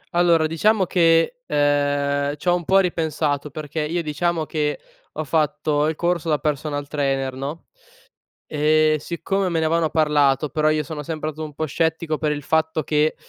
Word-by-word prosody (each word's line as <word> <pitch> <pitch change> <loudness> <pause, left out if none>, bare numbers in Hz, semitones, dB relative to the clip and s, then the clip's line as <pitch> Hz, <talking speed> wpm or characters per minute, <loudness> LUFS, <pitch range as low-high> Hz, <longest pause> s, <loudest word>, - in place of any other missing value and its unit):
Allora 170 -2 +4
diciamo 190 +5 +2
che, 165 +7 +3
ehm, 145 0 +1
c'ho 175 +4 +1
un 175 -2 -4
pò 190 +3 +4
ripensato 155 -5 0
perché 155 +2 -6
io, 165 +3 -2
diciamo, 160 +1 -1
che 150 -1 -2 0.3
ho 155 - -3
fatto 150 0 0
il 160 - -1
corso 170 -1 -1
da 150 - +3
personal 145 0 -2
trainer, 135 -3 -1
no, 140 +5 -6 0.8
e 155 +1 +2
siccome 190 +5 -2
me 170 -2 0
ne 160 - 0
avevano 165 0 +1
parlato 150 -3 +2
però 155 0 +1
io 155 0 +1
sono 155 -2 -6
sempre 155 0 -4
stato 155 +1 -6
un 150 - -10
pò 155 - -2
scettico 160 +1 -1
per 150 -1 0
il 145 -1 -6
fatto 160 0 0
che, 150 +2 +1
155 Hz, 170 wpm, -22 LUFS, 145-165 Hz, 0.8 s, Allora